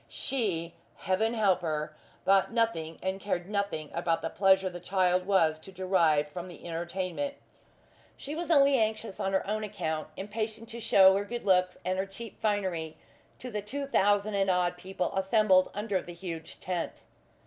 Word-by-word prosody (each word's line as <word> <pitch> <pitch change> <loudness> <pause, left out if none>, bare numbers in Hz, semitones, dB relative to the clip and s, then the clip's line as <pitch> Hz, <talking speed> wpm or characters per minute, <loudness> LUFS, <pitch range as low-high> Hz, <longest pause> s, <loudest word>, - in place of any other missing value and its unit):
She 190 - -1 0.2
Heaven 220 +5 0
help 195 -5 +3
her! 155 -2 -3 0.3
thought 195 +2 +4
nothing 225 -9 0
and 190 +1 -1
cared 185 -3 -2
nothing 200 -7 -2
about 170 -1 0
the 165 - -2
pleasure 190 -1 +4
the 175 -1 -5
child 180 0 +1
was 165 -6 +3
to 190 - -11
derive 175 -5 +2
from 175 +4 -7
the 175 - -12
entertainment. 180 +10 -3 0.8
She 285 - -6
was 340 +2 -4
only 280 -4 +5
anxious 220 -1 -1
on 195 - -1
her 190 - +1
own 215 +2 -2
account; 165 -7 -3
impatient 220 +2 -4
to 235 0 -7
shew 195 -4 +6
her 200 - 0
good 235 +2 -6
looks 180 -2 +3
and 185 +1 0
her 195 - -1
cheap 205 +3 -9
finery 185 -7 -1 0.4
to 250 - -7
the 210 -1 -2
two 275 +8 -4
thousand 205 -4 +2
and 195 -1 +1
odd 180 -1 +2
people 185 +1 -4
assembled 190 -1 +4
under 205 -2 -1
the 175 - -9
huge 165 -3 -7
tent. 175 -2 -4
190 Hz, 170 wpm, -29 LUFS, 175-215 Hz, 0.8 s, shew